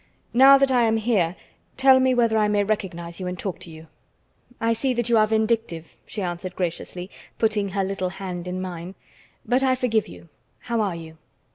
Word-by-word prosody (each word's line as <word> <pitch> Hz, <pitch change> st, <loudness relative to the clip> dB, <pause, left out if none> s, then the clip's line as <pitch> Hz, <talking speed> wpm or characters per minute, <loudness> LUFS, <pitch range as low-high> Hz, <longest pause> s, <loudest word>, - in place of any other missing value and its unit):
Now 270 Hz, +3 st, +8 dB
that 275 Hz, -1 st, +2 dB
I 245 Hz, -2 st, +4 dB
am 225 Hz, 0 st, +2 dB
here, 205 Hz, -7 st, +1 dB, 0.4 s
tell 265 Hz, 0 st, +6 dB
me 260 Hz, -1 st, +3 dB
whether 230 Hz, -2 st, +2 dB
I 215 Hz, -1 st, +3 dB
may 205 Hz, -1 st, +2 dB
recognize 175 Hz, -5 st, -3 dB
you 185 Hz, -, -4 dB
and 180 Hz, 0 st, -4 dB
talk 185 Hz, 0 st, -4 dB
to 180 Hz, -2 st, -11 dB
you." 160 Hz, 0 st, -12 dB, 0.7 s
"I 230 Hz, 0 st, +1 dB
see 250 Hz, +3 st, -1 dB
that 240 Hz, 0 st, -1 dB
you 235 Hz, -, +4 dB
are 215 Hz, -, +4 dB
vindictive," 220 Hz, -6 st, -1 dB
she 205 Hz, -, -5 dB
answered 180 Hz, +1 st, -5 dB
graciously, 180 Hz, +1 st, -4 dB, 0.3 s
putting 215 Hz, -3 st, +1 dB
her 195 Hz, +1 st, -1 dB
little 190 Hz, -1 st, -2 dB
hand 180 Hz, -2 st, -6 dB
in 180 Hz, +1 st, -4 dB
mine. 180 Hz, 0 st, -6 dB, 0.5 s
"But 250 Hz, +2 st, +2 dB
I 260 Hz, -1 st, +3 dB
forgive 225 Hz, -4 st, 0 dB
you. 170 Hz, -1 st, -13 dB, 0.3 s
How 235 Hz, -2 st, -1 dB
are 195 Hz, -5 st, -1 dB
you?" 160 Hz, -1 st, -10 dB
205 Hz, 200 wpm, -23 LUFS, 180-235 Hz, 0.7 s, Now